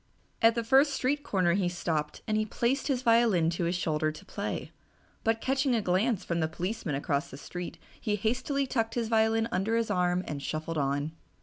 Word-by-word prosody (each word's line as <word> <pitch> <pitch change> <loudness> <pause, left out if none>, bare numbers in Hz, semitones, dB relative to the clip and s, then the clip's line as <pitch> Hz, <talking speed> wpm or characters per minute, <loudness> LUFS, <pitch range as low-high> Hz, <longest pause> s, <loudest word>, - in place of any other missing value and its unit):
At 225 +1 +6
the 235 - 0
first 270 +5 +4
street 270 +2 0
corner 185 -7 +2
he 185 -1 +1
stopped 160 -4 -2
and 215 0 0
placed 255 +6 0
his 260 -3 0
violin 230 -9 +4
to 170 0 -1
his 170 +2 0
shoulder 155 -2 0
to 155 - -12
play, - - -4 0.5
but 225 0 +1
catching 270 -1 +1
a 225 - +1
glance 195 +4 +1
from 170 -1 -1
the 160 - +1
policeman 180 -1 -3
across 140 +2 -1
the 135 - -9
street 175 +4 -6 0.2
he 210 - 0
hastily 255 +6 0
tucked 225 -3 -1
his 230 -2 -1
violin 225 0 +3
under 215 +4 +1
his 230 -1 0
arm 180 0 +1
and 145 -2 -4
shuffled 155 +2 -3
on. 140 +2 0
210 Hz, 195 wpm, -29 LUFS, 170-230 Hz, 0.5 s, At